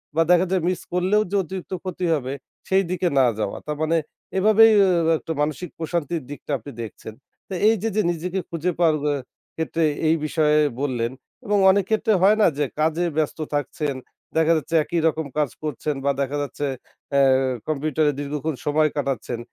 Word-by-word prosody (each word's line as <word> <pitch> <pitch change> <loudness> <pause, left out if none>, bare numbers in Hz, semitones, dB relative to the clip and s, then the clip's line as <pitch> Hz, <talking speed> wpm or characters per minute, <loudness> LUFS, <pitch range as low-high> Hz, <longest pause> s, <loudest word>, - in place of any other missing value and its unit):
বা 165 - +4
দেখা 180 +1 +5
যায় 185 -3 +1
মিস 185 - -2
করলেও 190 +4 +2
যে, - - 0
অতিরিক্ত 190 +2 -7
ক্ষতি 185 -1 -3
হবে 135 -2 -2 0.3
সেইদিকে 185 -1 +1
না 130 - +6
যাওয়া। 105 -2 -2
তার 150 -1 -3
মানে 165 +1 +2 0.4
এভাবেই 215 +3 +6 0.2
আ - - +3 0.3
একটা 160 - -5
মানসিক 155 +3 -2
প্রশান্তির 165 0 -2
দিকটা 145 +1 -7
আপনি 130 +5 -10
দেখছেন। 110 0 -8 0.3
তো 195 - -7
এইযে, 225 0 +2
যে, 215 - +3
নিজেকে 180 +3 -3
খুঁজে 170 +2 -1
পাওয়ার 160 -3 +4
অ্যা 145 -1 +1 0.4
ক্ষেত্রে 160 0 -1 0.2
এই 160 - +4
বিষয়ে 150 -1 +2 0.2
বললেন। 125 -4 -1 0.3
এবং 205 0 +2
অনেক 200 -1 +1
ক্ষেত্রে 220 0 +2
হয় 210 +3 +5
না? - - +6
যে, 145 - +1
কাজে 160 +3 +1
ব্যস্ত 155 +1 -1
থাকছেন, 145 -1 -2 0.4
দেখা 160 +1 +4
যাচ্ছে 165 +2 -3
একই 170 +2 -1
রকম 160 0 -1
কাজ 150 -4 +2
করছেন 150 0 -2
বা 140 - +4
দেখা 140 +2 -1
যাচ্ছে 145 0 -4 0.5
অ্যা 140 0 +4 0.5
কম্পিউটারে 155 0 +1
দীর্ঘক্ষণ 145 +1 -3
সময় 155 +1 +3
কাটাচ্ছেন। 130 -4 -2
160 Hz, 170 wpm, -23 LUFS, 145-180 Hz, 0.5 s, না